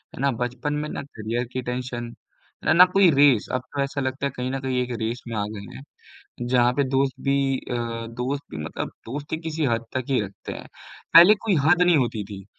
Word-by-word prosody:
है - - -11
ना? 140 -1 +3
बचपन 125 +4 -3
में 150 +1 -3
ना - - -4
करियर 120 -2 -4
की 130 - -2
टेंशन 125 -1 -5 0.5
न - - +4
ना 180 +2 +9
कोई 195 -3 +6
रेस। 140 -6 +4
अब 130 - 0
तो 140 - -1
ऐसा 140 +1 -2
लगता 130 +1 -2
है 140 - -1
कहीं 125 0 -3
न 135 - -2
कहीं 130 -1 -1
एक 125 - -6
रेस 115 +2 -3
में 115 - -5
आ 105 - 0
गए 100 -1 -9
हैं, 135 - -10 0.7
जहाँ 125 -1 +4
पे 140 - +2
दोस्त 135 0 +1
भी 135 -1 +2
अ, 125 - -6 0.3
दोस्त 125 +5 -3
भी 80 - -7
मतलब - - -4 0.2
दोस्ती 145 +5 -4
किसी 160 -1 -3
हद 115 -1 0
तक 130 -1 -1
ही 130 - +3
रखते 100 -1 -7
हैं, - - -8 0.5
पहले 175 +6 +10
कोई 205 -4 +2
हद 175 +3 +5
नहीं 175 -2 +5
होती 115 -6 0
थी, 100 -1 -8
130 Hz, 225 wpm, -24 LUFS, 120-145 Hz, 0.7 s, पहले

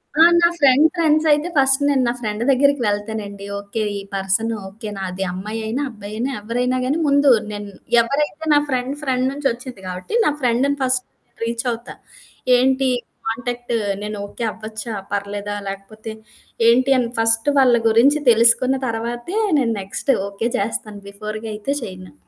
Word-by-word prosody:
ఆ! 320 - +4 0.2
నా 340 - +7
friend 275 +1 +6
friends 315 -2 +3
అయితే 295 +3 +2
ఫస్ట్ 270 0 +3
నేను 270 -3 +3
నా - - +2
ఫ్రెండు 215 -1 -3
దగ్గరికి 280 0 +3
వెళ్తానండి. 205 -1 -3
ఓకే. 205 +2 -4 0.2
ఈ - - -6
పర్సన్ 195 +4 0 0.2
ఓకే. 210 +3 -9
నాది 190 0 -3
అమ్మాయైనా, 220 +7 -4
అబ్బాయైనా 215 +3 -5
ఎవరైనా 245 +4 -1
గాని 275 +5 +1
ముందు 285 -1 +5 0.2
నేను 205 -1 -6 0.3
ఎవరైతే 295 +6 -2
నా 290 - +6
ఫ్రెండ్ 255 +1 -1
ఫ్రెండ్ 260 -3 0
నుంచొచ్చింది 255 -6 -3
కాబట్టి, 185 - -5
నా - - +3
ఫ్రెండ్‌ని 250 +3 +2
ఫస్ట్ 255 -1 +1 0.4
రీచ్ 235 +2 -2
అవుతా. 235 +1 -7 0.6
ఏంటి 260 +1 +2 0.4
కాంటాక్టు 245 0 -2 0.2
నేను 210 0 -4
ఓకే 215 +3 -7
అవ్వచ్చా? 220 +1 -7 0.2
పర్లేదా? 205 0 -3
లేకపోతే 195 +3 -7 0.6
ఏంటి 255 +4 +4
అని 240 -2 0
ఫస్ట్ 225 +2 +2
వాళ్ళ 250 -2 +5
గురించి 260 +7 +4
తెలుసుకున్న 235 +3 +4
తర్వాతే, 240 - -4 0.2
నేను 230 -3 +1
నెక్స్ట్ 195 +8 -1 0.2
ఓకే 200 +3 -2
చేస్తాను. 210 0 -4
బిఫోర్‌గా 215 +2 -6
అయితే 215 +7 -2
చేయను. 185 -5 -9
230 Hz, 145 wpm, -20 LUFS, 210-265 Hz, 0.6 s, నా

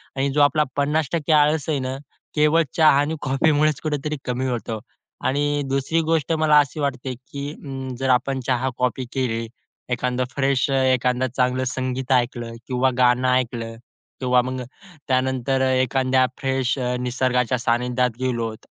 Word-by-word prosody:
आणि 135 +1 0
जो 145 - +3
आपला 150 +1 +4
50% 150 +2 0
आळस 150 0 +3
आहे 145 -3 +1
ना, 130 0 -3 0.4
केवळ 150 +2 +4
चहा 155 -1 +7
आणि 150 +3 0
कॉफीमुळेच 145 +2 +2
कुठेतरी 150 0 -2
कमी 125 +1 -2
होतो. 115 -3 -3 0.4
आणि 145 +2 +1
दुसरी 135 +5 0
गोष्ट 160 0 0
मला 155 -2 +5
अशी 145 +1 -1
वाटते 130 -2 -2
की 140 +3 -7
अं, 135 -4 -7
जर 135 0 -1
आपण 130 +2 +2
चहा-कॉपी 125 0 -1
केली, 115 -4 -1 0.4
एखादं 125 0 -1
फ्रेश 135 -1 +1
एखादं 130 -1 +2
चांगलं 130 0 0
संगीत 130 0 -3
ऐकलं 120 -2 0
किंवा 130 0 +2
गाणं 125 0 +3
ऐकलं 115 -2 -1 0.4
किंवा 125 -1 +3
मग 130 +1 -4 0.5
त्यानंतर 130 0 +1
अ, 130 - +2
एखाद्या 130 0 +2
फ्रेश 135 -1 0
अ, 125 0 -1
निसर्गाच्या 125 0 0
सानिध्यात 125 +1 +1
गेलोत, 115 -4 -2
130 Hz, 145 wpm, -22 LUFS, 125-145 Hz, 0.5 s, चहा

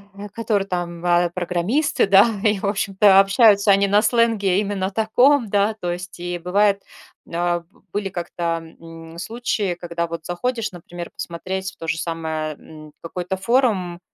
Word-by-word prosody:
э, 205 +1 -8
которые 210 -4 -1
там 175 -2 -3
ва 175 0 +2
программисты, 185 - 0
да, 195 +1 +7 0.2
и, 210 -2 +3
в - - -4
общем-то, 200 0 +4
общаются 200 +1 +5
они 200 0 +5
на 205 +1 +4
сленге 220 -5 +2
именно 200 -2 -2
таком, 230 +5 +3
да, 205 +2 +1
то 180 -5 -4
есть 180 +1 -7
и 175 0 -4
бывает 200 +3 +2 0.5
а, 175 +1 0
в - - -28
Были 200 -1 -2
как-то, 170 -2 -3 0.2
м, 165 0 -12
случаи, 215 -3 -2
когда 170 -1 -4
вот 165 -1 -7
заходишь, 230 +5 -2
например, 175 -1 -9
посмотреть 190 +2 -5
в - - -24
то 165 - -8
же 160 - 0
самое, 160 -2 -3
м, 155 0 -14
какой-то 180 +2 -4
форум, 190 -5 +1
190 Hz, 160 wpm, -21 LUFS, 175-205 Hz, 0.5 s, да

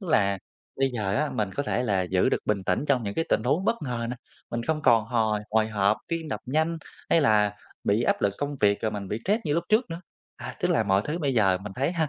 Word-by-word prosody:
Tức 190 - -8
là 100 -8 +3 0.4
bây 135 0 +2
giờ 100 -4 -1
á 150 +1 0
mình 105 -3 -1
có 140 - -1
thể 125 - -1
là 100 -6 +1
giữ 90 0 +1
được - - +1
bình 100 -2 0
tĩnh 90 +11 0
trong 130 -4 +3
những 100 -2 -4
cái 165 - 0
tình - - +2
huống 150 +9 +1
bất 230 - +2
ngờ 120 -4 -3
nữa, 125 - -4 0.3
mình 120 0 -2
không 155 +3 -1
còn 115 -4 +5
hồi 110 -2 0
hồi 110 0 +2
hộp, 105 -1 +2
tim 165 -2 -3
đập 105 - -3
nhanh 160 +5 0 0.3
hay 165 - +5
là 105 -6 +3 0.3
bị 105 +3 +2
áp - - +1
lực 100 -1 +2
công 145 0 -3
việc, 100 0 +3
rồi 110 - +1
mình 100 -2 -5
bị 105 - -2
stress 210 +4 +2
như 150 -3 0
lúc 170 +1 0
trước 215 -1 +2
nữa. 165 +1 -5 0.4
À, - - -8
tức - - +1
là - - +3
mọi 100 -1 +2
thứ 155 +3 -2
bây 140 -6 0
giờ 95 -5 +3
mình 100 +1 -8
thấy 140 +6 0
ha, 160 -4 0
115 Hz, 275 wpm, -26 LUFS, 105-150 Hz, 0.4 s, còn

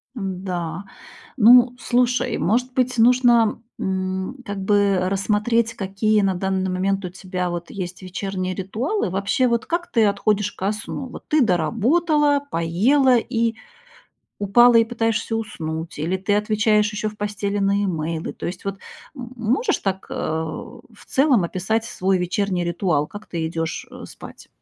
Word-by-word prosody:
М-да. 185 -3 -4 0.5
Ну, 245 +2 +7
слушай. 245 +1 +1
Может 250 +6 0
быть, 255 -2 0
нужно, 235 -2 +4 0.2
м, 190 +5 -2
как 200 -1 -5
бы 200 -1 +3
рассмотреть, 220 +4 +1
какие 210 +1 +1
на 195 -1 +1
данный 190 0 -1
момент 195 +1 -1
у - - -4
тебя 180 0 -4
вот 175 0 -5
есть 185 -1 -6
вечерние 185 0 -4
ритуалы? 215 - -2
Вообще, 200 +7 +1
вот 235 -1 0
как 345 +1 -3
ты 225 -3 +4
отходишь 205 0 +1
ко 195 +2 -1
сну? 235 +5 -6
Вот 250 - -11
ты 305 -1 +3
доработала, 285 - +2
поела 240 - +3
и 230 -1 0 0.9
упала 240 +4 +6
и 230 - +6
пытаешься 225 -1 -1
уснуть 165 -8 -5
или 170 +5 -1
ты 200 +2 0
отвечаешь 210 0 +2
еще 210 +1 -2
в 210 - -10
постели 205 -1 -2
на 200 0 +1
имейлы. 165 -2 -3
То - - -7
есть, 180 +1 -6
вот, 195 0 -3 0.4
м, 245 -1 -8
можешь 250 - 0
так, 190 -1 -3
э, - - -4
в 160 0 -5
целом 265 -6 +3
описать 195 +6 -1
свой 190 -3 0
вечерний 180 0 -1
ритуал, 170 -4 0
как 205 +1 -10
ты 165 -2 -3
идешь, 165 0 -3
э, - - -10
спать? - - -12
205 Hz, 150 wpm, -22 LUFS, 185-235 Hz, 0.9 s, Ну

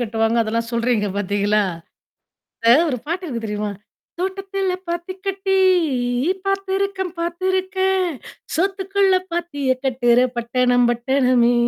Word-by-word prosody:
கட்டுவாங்க 225 0 0
அதெல்லாம் 230 +1 -2
சொல்றீங்க 230 -3 +1
பாத்தீங்களா? 205 +1 +1 1.0
அதாது 240 +7 +6
1 250 - -2
பாட்டு 350 +4 -3
இருக்கு, 230 -6 -4
தெரியுமா? 210 -1 -3 0.5
தோட்டத்துல 385 0 -2 0.2
பாத்தி 345 +2 -3
கட்டி 385 0 -1 0.9
பார்த்திருக்கன், 390 -1 -1
பார்த்திருக்கன்! 375 +1 0 0.4
சோத்துக்குள்ள 390 +2 +1 0.2
பாத்திய 290 -6 -1
கட்டுற 245 -1 +3
பட்டணம் 245 +1 +2
பட்டணமே! 245 0 +2
280 Hz, 100 wpm, -21 LUFS, 235-380 Hz, 1.0 s, அதாது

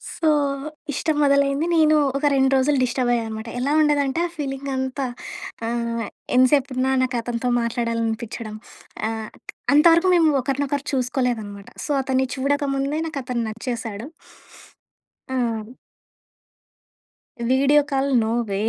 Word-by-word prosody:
So 325 - 0 0.7
ఇష్టం 310 +3 0
మొదలైంది. 280 +1 +3
నేను 310 -1 +5 0.2
ఒక 290 - -2
2 265 0 +3
రోజులు 275 +2 +2
డిస్టర్బ్ 245 0 0
అయ్యానమాట. 225 -1 -3
ఎలా 270 +3 0
ఉండేదంటే 290 -1 +2
ఆ - - -12
ఫీలింగ్ 275 -1 -4
అంతా 265 +1 -2 0.6
ఆహ్, 235 -1 -2 0.3
ఎంత 255 +1 +6
సేపున్నా 265 -2 +1
నాకతనితో 240 -1 -2
మాట్లాడాలనిపిచ్చడం. 230 -1 -2 0.5
ఆహ్, 220 -1 -5 0.4
అంతవరకు 335 +4 +6
మేము 330 -2 +5
ఒకరినొకరు 280 +1 -2
చూసుకోలేదనమాట. 245 -6 -2 0.2
సో - - -3
అతన్ని 265 0 0
చూడక 285 +2 0
ముందే 275 +3 -1
నాకతను 250 -6 -3
నచ్చేశాడు. 230 0 -5 1.3
ఆ! - - 0 2.2
Video 280 +3 +5
call 275 0 +1 0.2
no 220 - -1 0.2
way. 195 - -1
260 Hz, 110 wpm, -22 LUFS, 235-280 Hz, 2.2 s, ఎంత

